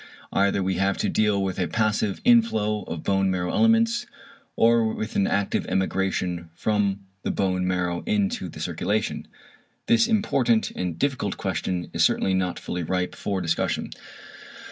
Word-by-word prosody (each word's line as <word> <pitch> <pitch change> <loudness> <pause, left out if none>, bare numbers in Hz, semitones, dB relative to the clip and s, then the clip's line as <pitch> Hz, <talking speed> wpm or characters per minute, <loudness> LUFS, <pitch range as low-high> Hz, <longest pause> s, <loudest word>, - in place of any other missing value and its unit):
Either 100 0 +2
we 95 -1 -1
have 95 +1 +1
to - - 0
deal 105 -2 +2
with 95 -1 -3
a 90 - +1
passive 110 -2 0
inflow 110 - +3
of 80 - -6
bone 95 -1 +2
marrow 90 -1 -1
elements, 230 +1 +3 0.5
or 115 -1 +4
with 110 - -5
an 100 - +2
active 100 -1 0
emigration 95 -2 -1
from 100 0 0 0.2
the - - -3
bone 90 -2 0
marrow 90 -1 -1
into 210 +2 0
the - - -10
circulation. - - -2 0.6
This 235 -1 +4
important 135 - +2
and 90 -3 -4
difficult 135 +6 -1
question 90 -2 -3
is - - +2
certainly 95 - +2
not 90 -1 0
fully 90 - -4
ripe 90 +2 -1
for 100 -2 -3
discussion. 85 -2 -1
100 Hz, 150 wpm, -25 LUFS, 90-115 Hz, 0.6 s, or